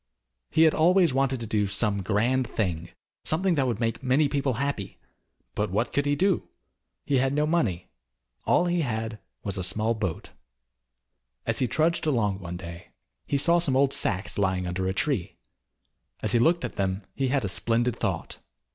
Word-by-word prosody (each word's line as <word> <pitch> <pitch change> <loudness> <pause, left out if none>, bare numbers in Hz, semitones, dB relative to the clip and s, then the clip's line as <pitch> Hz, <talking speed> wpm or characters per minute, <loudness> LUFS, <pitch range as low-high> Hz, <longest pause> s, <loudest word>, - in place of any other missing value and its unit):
He 160 - +4
had 160 - +5
always 175 -1 +4
wanted 135 -1 +1
to - - -3
do 105 -2 0
some 100 0 +1
grand 115 +6 +1
thing, 85 -5 -2 0.3
something 180 +4 +1
that 135 -5 +1
would 115 -4 -1
make 115 -1 -1
many 135 +3 +3
people 140 -2 0
happy, 125 -5 -3 0.6
but 105 +1 -1
what 105 +6 -1
could 140 0 +1
he 145 - +2
do? 190 +2 +1 0.6
He 135 -2 +2
had 135 +1 +1
no 150 +1 +2
money. 120 - 0 0.6
All 175 - +3
he 175 -1 +1
had 110 -5 -3 0.2
was 100 -1 -2
a - - -2
small 110 +5 +1
boat. 100 -7 -4 1.1
As 115 -1 0
he 130 - +2
trudged 160 +6 +1
along 105 -9 +1
one 90 -2 -6
day, 85 -1 -9 0.4
he 140 - +1
saw 170 +4 +3
some 145 -6 +1
old 135 +1 +3
sacks 95 +2 -1
lying 95 -2 +1
under 90 +1 -2
a 95 - 0
tree. 125 - -1 0.8
As - - -1
he 120 - +4
looked 165 +7 +3
at - - -7
them 95 0 -1
he 135 0 -1
had 130 -3 +1
a - - 0
splendid 115 +4 +1
thought. - - -3
120 Hz, 180 wpm, -26 LUFS, 100-145 Hz, 1.1 s, had